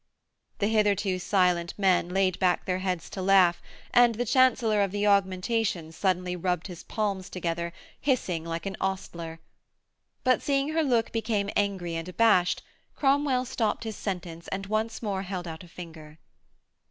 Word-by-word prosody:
The 200 - 0
hitherto 205 -3 +2
silent 180 -3 +1
men 185 -3 +3
laid 190 -1 +1
back 180 -2 +2
their 185 0 -1
heads 185 -3 -2
to 190 - -5
laugh, 185 -2 +4 0.3
and 240 -1 +6
the 245 +3 -1
Chancellor 240 -3 +3
of 200 - +2
the 205 +2 -1
Augmentations 190 -3 +1
suddenly 180 -1 0
rubbed 180 -1 -1
his 175 -3 -8
palms 200 -4 -2
together, 170 -1 -3 0.3
hissing 195 - 0
like 165 +1 -4
an 195 0 -3
ostler. 170 -4 -4 0.8
But, 255 0 +3
seeing 275 0 +1
her 320 +1 +1
look 240 -6 +1
became 220 -3 -1
angry 195 -4 0
and 165 +2 -4
abashed, 185 -3 +3 0.3
Cromwell 270 -2 +2
stopped 225 -3 -1
his 220 -2 -5
sentence 175 -5 -5
and 195 0 -4
once 215 +3 -2
more 195 -3 -1
held 185 -2 -5
out 160 +1 -7
a - - -13
finger. 160 -3 -11
190 Hz, 155 wpm, -27 LUFS, 180-220 Hz, 0.8 s, and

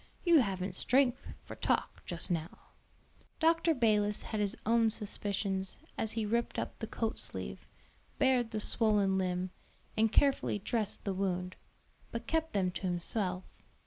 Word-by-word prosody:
You 340 -3 +6
haven't 190 -5 -1
strength 255 +2 +2
for - - -9
talk - - 0
just 175 +1 -2
now." 165 -1 -2 0.8
Dr. 330 0 +3
Balis 210 -4 +2
had 215 - -3
his 205 0 0
own 230 0 +4
suspicions 200 -3 -2 0.2
as 220 -1 +2
he 225 -1 -1
ripped 235 +3 0
up - - -4
the 225 - -4
coat 225 0 -2
sleeve, - - -5 0.5
bared 255 -3 +3
the 215 -1 -3
swollen 205 -3 +2
limb, 180 0 -1 0.4
and 220 0 +3
carefully 275 -6 +3
dressed 210 +1 -2
the 200 - -1
wound; 185 -1 -2 0.6
but 230 0 -4
kept 320 +3 0
them 185 -3 +1
to 180 - -6
himself. 185 +1 -1
210 Hz, 145 wpm, -32 LUFS, 190-235 Hz, 0.8 s, You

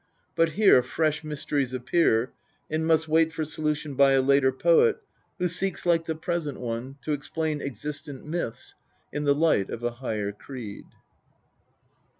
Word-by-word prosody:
But 165 -1 +2
here 200 -9 +6
fresh 155 +3 -1
mysteries 145 -3 -2
appear, 125 -3 +2 0.4
and 160 +1 0
must 160 0 +3
wait 160 +1 +3
for 160 -1 -3
solution 150 -1 -2
by 135 0 +5
a 135 - +4
later 140 0 +4
poet 465 - +4 0.4
who 180 - +1
seeks, 180 +2 -2
like 165 -2 +3
the 160 - -1
present 160 -2 -3
one, 120 +2 -4
to 155 - -3
explain 150 +1 -2
existent 140 +2 -6
myths 155 -7 -4 0.4
in 145 0 -2
the 140 0 +4
light 150 -10 +2
of 115 - -6
a 120 - 0
higher 110 -4 -3
creed. 105 -1 -9
150 Hz, 150 wpm, -26 LUFS, 130-160 Hz, 0.4 s, here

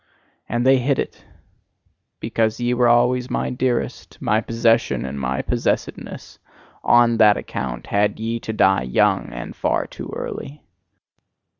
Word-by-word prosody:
And 120 +1 -1
they 135 0 +5
hit 135 +2 +1
it! - - -4 1.0
Because 110 0 -1
ye 120 0 0
were 125 0 +3
always 125 +1 +3
my - - -2
dearest, 125 -1 -2
my 110 +1 +1
possession 115 - +1
and 70 +1 -5
my 65 0 -2
possessedness: - - -3 0.4
ON 120 -1 +4
THAT 105 -2 +6
ACCOUNT 65 -2 -5
had 105 +1 0
ye 115 +1 -2
to 110 - -5
die 95 -5 +3
young, 65 0 +1
and - - -7
far - - 0
too - - -9
early! 70 +3 -6
115 Hz, 140 wpm, -21 LUFS, 100-120 Hz, 1.0 s, THAT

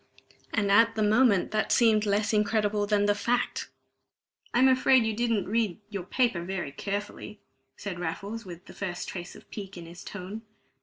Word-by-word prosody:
And 205 -2 +1
at 230 +3 +5
the 215 - +1
moment 210 -2 +3
that 215 0 0
seemed 220 -3 +4
less 205 +2 +1
incredible 210 -1 +1
than 205 -1 +2
the 205 - +4
fact. 240 +4 -1 0.8
"I'm 255 +2 +5
afraid 260 -2 +5
you 220 - 0
didn't 230 -3 0
read 215 -3 0
your 200 -3 -3
paper 235 -4 +1
very 175 -4 -4
carefully," 200 +7 -5 0.4
said 190 -4 -5
Raffles, 200 +7 -4
with 180 0 -10
the - - -12
first 180 -3 -4
trace 175 -2 -7
of - - -15
pique 200 -2 -7
in 170 - -8
his 170 +1 -11
tone. 205 +2 -7
205 Hz, 170 wpm, -28 LUFS, 190-225 Hz, 0.8 s, at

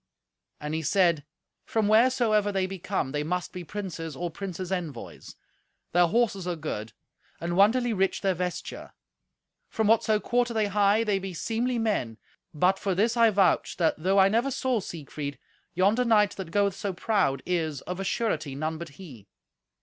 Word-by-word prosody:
And 150 +1 -5
he 160 - -1
said, 165 -2 +2 0.4
"From 220 -2 0
wheresoever 220 -2 +3
they 190 -1 0
be 190 0 -6
come, 170 -7 -2
they 150 +1 -1
must 180 +4 -3
be 180 - -6
princes, 165 -4 -6
or 175 +2 -4
princes' 185 0 -6
envoys. 165 -10 -5 0.6
Their 175 0 +4
horses 200 -3 0
are 175 - -1
good, 115 -9 -5 0.5
and 170 +1 -2
wonderly 230 +5 +4
rich 195 -1 0
their 195 -2 +2
vesture. 180 0 -5 0.8
From 220 - -1
whatso 215 0 +3
quarter 240 +1 0
they 215 -1 +2
hie, 205 +2 +3
they 205 -3 +1
be 190 -2 -6
seemly 235 +7 -1
men. 205 - -1 0.3
But 180 +5 +2
for 195 -2 -1
this 225 +5 +2
I 230 -1 +5
vouch, 195 -5 +2
that, 165 -3 +3
though 190 +5 +1
I 190 0 +7
never 230 +7 +1
saw 255 -2 0
Siegfried, 150 -6 -6 0.4
yonder 200 +7 +3
knight 215 -4 +4
that 190 -4 -7
goeth 200 +2 +2
so 195 +1 -4
proud 180 - 0
is, 160 -6 -1
of 180 +1 -6
a - - -2
surety, 160 - -1
none 155 +2 -3
but 170 -1 -7
he. 130 - -12
190 Hz, 175 wpm, -27 LUFS, 165-215 Hz, 0.8 s, I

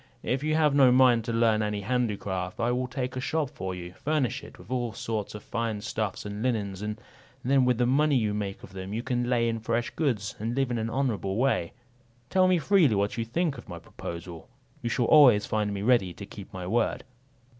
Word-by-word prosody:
If 135 +2 -1
you 155 0 +1
have 155 -2 +3
no 135 -3 +6
mind 125 -2 +5
to 115 - -2
learn 115 -1 +3
any 105 -1 -1
handicraft, 100 -6 -2
I 120 +1 +1
will 125 +1 -1
take 125 -1 -4
a 130 - -3
shop 150 0 -1
for 95 -10 -5
you, 90 0 -8
furnish 145 +1 -1
it - - -12
with - - -14
all 120 -3 -1
sorts 110 -2 -4
of 105 - -8
fine 115 -3 -3
stuffs 105 -2 -3
and 105 +1 -5
linens; 105 -6 -1
and 105 +1 -4 0.4
then 135 0 +3
with 125 -2 +2
the 120 - +2
money 145 +4 +3
you 110 -4 +1
make 100 -2 -4
of - - -12
them 95 +1 -6
you 115 +2 -2
can 125 -2 -1
lay 120 -2 +2
in 115 -1 -1
fresh 115 +2 -1
goods, 110 -10 -1
and 115 +3 -2
live 135 -2 0
in 120 - -1
an 110 +1 -2
honourable 115 -7 -1
way. 120 -8 +1 0.6
Tell 185 -1 +4
me 185 -1 +4
freely 165 - +4
what 100 +1 0
you 115 - -2
think 155 +5 -1
of - - -13
my - - -6
proposal; 85 -1 -8 0.3
you 120 - -2
shall 120 0 +1
always 125 -8 +7
find 105 -1 -1
me 100 0 -3
ready 110 -7 +3
to 100 - -8
keep 100 0 -11
my 90 -1 -6
word." 115 +5 0
115 Hz, 225 wpm, -27 LUFS, 105-130 Hz, 0.6 s, always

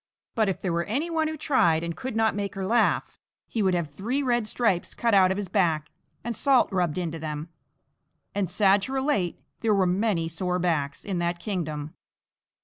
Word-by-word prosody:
But 220 -4 +2
if 190 - -2
there 180 -3 -2
were 170 0 0
any 285 +11 -2
one 320 -1 +1
who 315 0 -4
tried 175 - +2
and 170 -1 -3
could 260 -3 -5
not 225 0 +3
make 200 -1 -3
her 195 -1 -3
laugh, 235 +5 +1 0.3
he 225 - -2
would 190 -2 +2
have 170 -3 -1
three 230 - -2
red 240 -4 +1
stripes 215 -7 0
cut 230 -2 +1
out 190 -2 +6
of 190 - 0
his 205 -2 -3
back 160 -4 +1 0.3
and 235 0 -3
salt 270 -3 +3
rubbed 180 -5 0
into 165 -2 -3
them 155 +1 -5 0.8
and, 200 -4 -1
sad 195 +1 +4
to 260 +7 -4
relate, 265 - 0 0.2
there 220 -2 +2
were 195 -1 +3
many 185 -2 +1
sore 180 +2 -2
backs 160 -6 -1
in 190 -4 -2
that 175 0 -1
kingdom. 160 -5 -4
190 Hz, 200 wpm, -26 LUFS, 170-225 Hz, 0.8 s, out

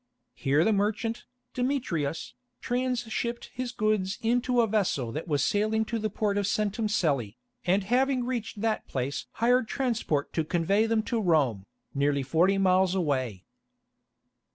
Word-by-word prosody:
Here 145 +4 +2
the 220 - +3
merchant, 215 +3 -1 0.3
Demetrius, 240 - -2 0.3
transhipped 240 -1 -2
his 255 -1 -3
goods 215 -4 0
into 245 +1 +2
a - - +4
vessel 195 - 0
that 155 +8 -5
was 145 -4 +1
sailing 215 +2 +1
to 230 +1 -2
the 215 0 -1
port 205 0 0
of 200 - 0
Centum 215 +1 0
Cellæ, 140 - 0 0.3
and 190 +2 +2
having 255 +4 +1
reached 235 -4 -4
that 225 -1 -1
place 135 +1 -3
hired 245 +1 +2
transport 230 - -1
to 160 - +1
convey 185 +7 +1
them 225 -1 +1
to 235 -1 -1
Rome, 135 - +1 0.3
nearly 140 0 +1
forty 170 +8 +3
miles 190 -1 +3
away. 130 - -1
205 Hz, 145 wpm, -28 LUFS, 160-230 Hz, 0.3 s, a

